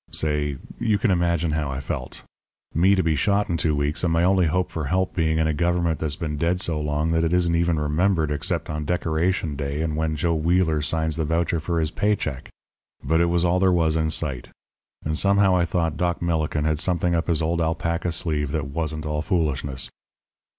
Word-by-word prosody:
"Say 75 -2 -1 0.2
you 105 -2 +2
can 105 0 +1
imagine 85 -2 +1
how 75 -2 -1
I 65 -1 -3
felt 70 -3 -5 0.5
me 95 +5 +4
to 95 - +1
be 80 -1 +1
shot 100 +7 +1
in 85 - 0
two 80 -2 +1
weeks 75 +3 -1
and 85 - +2
my 85 +1 +2
only 95 -1 +3
hope 90 +4 0
for 80 -3 -3
help 95 +6 0
being 80 -2 +1
in 80 - +2
a 80 - +1
government 85 0 0
that's 75 -2 -1
been 75 -3 -4
dead 85 +4 0
so 80 -4 -1
long 75 +2 -1
that 80 0 +2
it 80 - +1
isn't 90 -1 +2
even 85 -1 +1
remembered 80 +1 +1
except 75 -1 -2
on 75 0 -3
Decoration 85 0 0
Day 70 +1 -3
and 80 -2 -2
when 80 0 -1
Joe 85 +2 0
Wheeler 80 -1 +1
signs 80 0 -1
the 80 - 0
voucher 80 +1 0
for 85 +1 -1
his 80 -1 0
pay 105 0 +1
check. 65 -9 -5 0.5
But 80 +1 +2
it 85 - +3
was 85 0 +1
all 90 +1 +2
there 95 0 +4
was 80 -3 +2
in 80 -1 +1
sight; 70 -6 -2 0.6
and 80 +1 -1
somehow 100 +1 +4
I 85 -1 +2
thought 80 -3 -1
Doc 85 0 0
Millikin 80 -3 -1
had 80 -1 +1
something 85 0 +1
up 85 -1 0
his 80 -2 +1
old 85 +1 0
alpaca 85 +1 -1
sleeve 75 -4 -1
that 75 -3 -2
wasn't 75 +1 -3
all 75 0 -1
foolishness. 75 -6 -1
80 Hz, 215 wpm, -23 LUFS, 75-85 Hz, 0.6 s, me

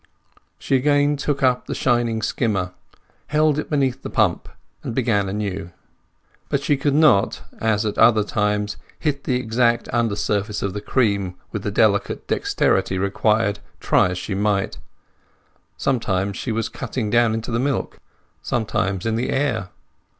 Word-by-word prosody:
She 135 - 0
again 145 +2 +3
took 145 -1 -2
up 125 -1 +2
the - - -3
shining 120 -3 +1
skimmer, 100 -7 0 0.6
held 150 0 +2
it - - -5
beneath 135 -3 0
the - - -6
pump, - - +1 0.3
and 115 - -5
began 105 -6 +1
anew. 100 -3 -3 0.8
But - - 0
she 145 - +2
could 140 +1 0
not, 145 -11 +4 0.2
as 110 -1 +1
at 105 - -2
other 110 -2 +6
times, 105 0 -1 0.2
hit 140 -3 -2
the 125 - +1
exact 120 0 +1
under 115 -3 +1
surface 105 0 -1
of 100 - -2
the 105 - -4
cream 100 -6 0 0.2
with - - -3
the - - -2
delicate - - +1
dexterity 95 - +1
required, 105 +1 +1 0.2
try - - +3
as 90 - -3
she 95 +2 -4
might; 100 0 0 1.0
sometimes 100 -7 0
she 120 - -3
was 110 0 -1
cutting 115 -2 -4
down 120 -2 +3
into 115 +2 -4
the 115 - 0
milk, 135 0 -2 0.4
sometimes 100 -4 -1
in 115 0 0
the 120 - -1
air. 120 -9 0
115 Hz, 155 wpm, -22 LUFS, 100-130 Hz, 1.0 s, other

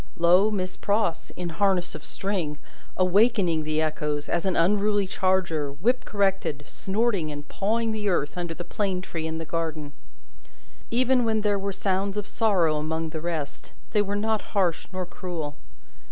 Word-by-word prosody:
Lo, 180 +5 +5
Miss 185 -3 -2
Pross, 205 -5 0
in 180 -1 -3
harness 180 +1 +1
of - - -8
string, 180 -7 -2 0.4
awakening 185 -3 +3
the 155 0 -1
echoes, 150 -1 -1
as 175 +3 0
an 185 - +1
unruly 205 +3 +3
charger, 185 -6 +1
whip 235 - +1
corrected, 195 -8 0
snorting 200 -5 0
and 145 0 -7
pawing 225 +3 0
the 210 -2 -1
earth 150 -5 0
under 175 -2 -3
the 175 - -5
plane 185 0 -1
tree 160 -3 -4
in 160 0 -3
the 165 - -4
garden! 155 -3 -3 1.0
Even 250 +1 +3
when 220 -1 +1
there 205 -1 +1
were 200 +1 -2
sounds 195 +1 -1
of 205 - -1
sorrow 185 -10 +2
among 160 +1 -2
the 155 - -4
rest, 160 -4 -4 0.2
they 210 - +3
were 205 0 -1
not 220 +1 +1 0.2
harsh 180 -4 +1
nor 185 -1 -3
cruel. 170 -5 -5
185 Hz, 165 wpm, -26 LUFS, 160-205 Hz, 1.0 s, Lo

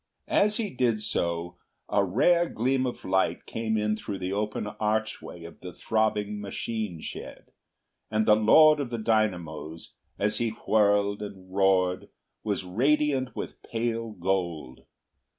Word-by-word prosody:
As 210 +1 +3
he 220 -3 -2
did 120 -4 +1
so 85 -4 -2 0.3
a 100 - +2
rare 170 - +3
gleam 130 +3 +1
of 125 - -6
light 95 0 +1
came 110 -1 -2
in 105 0 +1
through 100 -2 -5
the 95 +1 -3
open 105 +1 -2
archway 105 -4 -3
of 85 - -11
the 90 - -8
throbbing 105 0 -1
machine 105 -2 -4
shed, - - -8 0.6
and 110 0 +1
the 105 - +6
Lord 150 +8 +6
of 140 -4 -2
the 120 - -3
Dynamos, 90 -8 -1 0.2
as 105 +1 0
he 115 -2 -1
whirled 100 -1 +3
and 95 -3 -9
roared, 95 -2 +2 0.3
was 100 -3 -1
radiant 130 +4 +1
with - - -6
pale 115 0 -2
gold. 85 -8 -2
105 Hz, 140 wpm, -27 LUFS, 95-115 Hz, 0.6 s, the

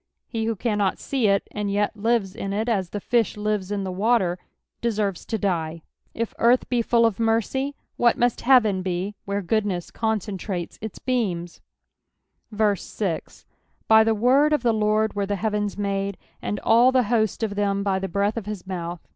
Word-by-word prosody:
He 225 -2 -2
who 225 0 0
Gannot 205 -2 0
see 260 -6 0
it, 200 -1 +2
and 210 -1 -3
jet 205 +2 0
lives 215 -3 0
in 195 -3 -4
it 215 +3 -1
as 195 -6 0
the 205 - -4
fish 230 0 +1
Ures 210 -2 -2
in 200 -1 -1
the 190 - -3
water, 190 -2 +1 0.4
deserves 210 -5 -1
to 225 - -1
die. 165 -5 -2 0.3
^carth 235 +2 +2
be 245 -2 +2
full 230 0 +3
of 225 -4 +1
mercj, 230 +5 0 0.2
what 235 -1 +3
must 245 -1 +1
heaven 220 -7 +4
be 185 +2 -2
where 200 0 -2
goodness 195 -2 -1
coaceatrates 205 -5 -3
its 220 -1 -6
besmaf) 190 -10 -2 1.2
6 190 -7 -4 0.4
By 220 0 +7
the 225 0 +2
word 265 +7 +4
of 295 -5 +1
the 235 -2 +3
Lord 215 0 +1
were 200 -1 -2
the 205 - 0
heavens 210 0 -1
made; 200 -1 -2 0.2
and 205 - -3
all 235 +3 +5
the 260 -1 +3
host 220 0 0
of 215 -2 -1
them 200 -1 0
by 195 -1 +1
the 195 - -3
breath 200 +4 0
of 215 -3 -4
his 210 -4 -5
mouth. 175 -2 -5
210 Hz, 180 wpm, -24 LUFS, 195-230 Hz, 1.2 s, By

